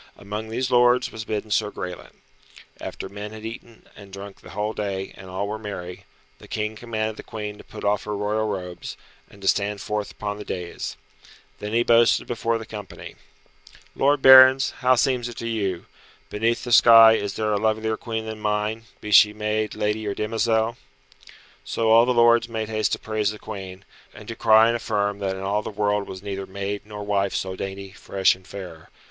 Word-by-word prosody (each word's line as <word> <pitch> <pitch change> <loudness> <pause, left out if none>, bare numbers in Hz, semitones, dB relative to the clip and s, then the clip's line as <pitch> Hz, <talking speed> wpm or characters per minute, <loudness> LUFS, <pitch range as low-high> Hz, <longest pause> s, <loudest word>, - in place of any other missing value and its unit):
Amongst 105 +2 -6
these 125 +3 -2
lords 125 0 +4
was 110 0 -7
bidden 105 0 -4
Sir 105 0 +1
Graelent. 90 -3 -8 0.6
After - - -6
men 105 +2 -8
had 110 0 -9
eaten 115 0 -9
and 100 -1 -13
drunk 100 +1 -10
the - - -13
whole 105 +2 -3
day, 95 -3 -4
and 95 - -12
all 95 +2 -3
were 110 +1 -4
merry, 90 -4 -7 0.3
the - - -14
King 110 0 -3
commanded 110 -1 -3
the - - -7
Queen 105 -1 -7
to - - -11
put - - -11
off 105 0 0
her 105 -1 -3
royal 105 +2 -1
robes, 90 -4 -6 0.3
and 100 -1 -17
to - - -3
stand 100 +1 +1
forth 105 +1 -3
upon 105 -1 -5
the - - -6
dais. 90 -3 -5 0.6
Then 105 +1 -5
he 120 +1 +3
boasted 115 0 +4
before 115 -1 -1
the 110 - -8
company, 105 -3 -9 0.8
"Lord 140 0 +2
barons, 130 0 +8
how 130 0 +4
seems 120 0 +1
it 120 - -10
to 115 - -4
you? 100 -6 -2 0.5
Beneath 115 +3 0
the 120 - -5
sky 115 -1 +9
is 100 -2 -2
there 110 -1 0
a - - +2
lovelier 110 +1 0
Queen 110 -1 -5
than 110 -1 -6
mine, 105 +1 -2 0.2
be 105 - -6
she 105 0 +7
maid, 105 0 -2
lady 105 +1 -1
or 100 - -2
demoiselle?" 110 +1 0 0.9
So 115 -1 0
all 115 +2 +6
the - - +3
lords 120 0 +4
made 110 -1 -4
haste 110 -1 0
to - - 0
praise 110 -2 -1
the 105 - -6
Queen, 95 -3 -8 0.3
and - - -12
to 115 - -5
cry 110 -1 +6
and 115 +1 +2
affirm 105 -3 -1
that 95 -1 -2
in 95 - -7
all 100 +2 0
the - - -6
world 105 -1 -1
was 95 0 -9
neither 100 -1 -5
maid 100 +1 -4
nor 105 -1 -7
wife 100 -1 0
so 95 0 -3
dainty, 95 0 -6
fresh 95 0 +1
and 95 0 -15
fair. 90 -5 -9
105 Hz, 200 wpm, -24 LUFS, 100-115 Hz, 0.9 s, sky